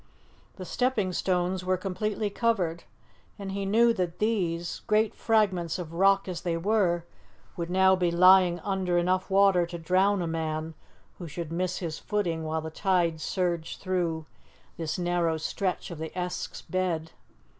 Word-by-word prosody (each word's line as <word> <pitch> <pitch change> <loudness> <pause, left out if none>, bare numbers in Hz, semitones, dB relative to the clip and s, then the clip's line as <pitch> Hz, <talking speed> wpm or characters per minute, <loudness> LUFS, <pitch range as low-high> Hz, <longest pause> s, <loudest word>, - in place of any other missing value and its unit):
The 185 - -8
stepping 215 -3 0
stones 180 +1 0
were 185 0 +1
completely 205 +3 -2
covered, 190 -8 0 0.5
and 195 -1 -6
he 195 0 -3
knew 230 +3 +4
that 180 -5 -2
these 175 -6 -1
great 215 +1 +2
fragments 190 -7 +1
of 170 -3 -7
rock 195 +3 +3
as 180 -3 -4
they 170 -2 -1
were 175 -2 +1 0.5
would 170 -1 -4
now 190 +1 +5
be 180 -2 +1
lying 180 0 +6
under 190 -3 0
enough 185 +2 +1
water 195 -3 +4
to 170 0 -6
drown 185 +3 +2
a - - -1
man 160 -1 -3 0.5
who 175 - -6
should 165 +1 -6
miss 180 +2 -1
his 165 -3 -4
footing 175 -6 -1
while 160 0 -2
the 160 0 -6
tide 170 -3 +1
surged 170 -2 -2
through 175 -4 -1 0.5
this 160 -2 -3
narrow 175 -2 0
stretch 180 +4 -3
of 165 - -7
the 160 0 -5
Esk's 180 0 -4
bed. 170 -4 -2
180 Hz, 155 wpm, -27 LUFS, 170-195 Hz, 0.5 s, lying